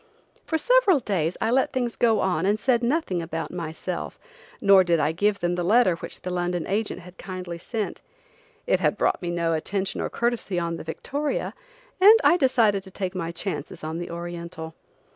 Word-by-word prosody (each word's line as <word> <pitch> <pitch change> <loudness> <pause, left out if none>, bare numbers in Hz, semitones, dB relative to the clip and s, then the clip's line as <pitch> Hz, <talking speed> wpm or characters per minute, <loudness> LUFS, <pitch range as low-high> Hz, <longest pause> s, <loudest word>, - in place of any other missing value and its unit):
For 320 - +1
several - - +4
days 180 -8 -1
I 225 - 0
let 265 +1 +2
things 245 -3 -2
go 225 -3 +3
on 190 -1 0
and 210 +2 +2
said 240 +1 +2
nothing 240 - 0
about 165 0 -4
myself, 170 +1 -5 0.4
nor 195 -2 +6
did 170 -2 +2
I 150 - +2
give 200 +5 +1
them 175 0 +1
the 175 - -1
letter 205 -1 +4
which - - -7
the 180 - -3
London 175 -1 -1
agent 205 -1 -2
had 180 +1 -14
kindly 180 -2 -6
sent. 215 +3 -4 0.6
It - - +2
had - - +1
brought - - +1
me 175 - -3
no 170 -1 0
attention 190 +5 -2
or - - -2
courtesy 235 -6 -1
on 170 -1 -1
the - - -7
Victoria, 280 - -3 0.5
and 415 +4 +9
I - - +6
decided 235 - +3
to 190 - -13
take 185 -1 -4
my 170 -3 -3
chances 180 0 -5
on 160 +2 -4
the 175 - -5
Oriental. 170 -1 -6
185 Hz, 190 wpm, -25 LUFS, 170-230 Hz, 0.6 s, and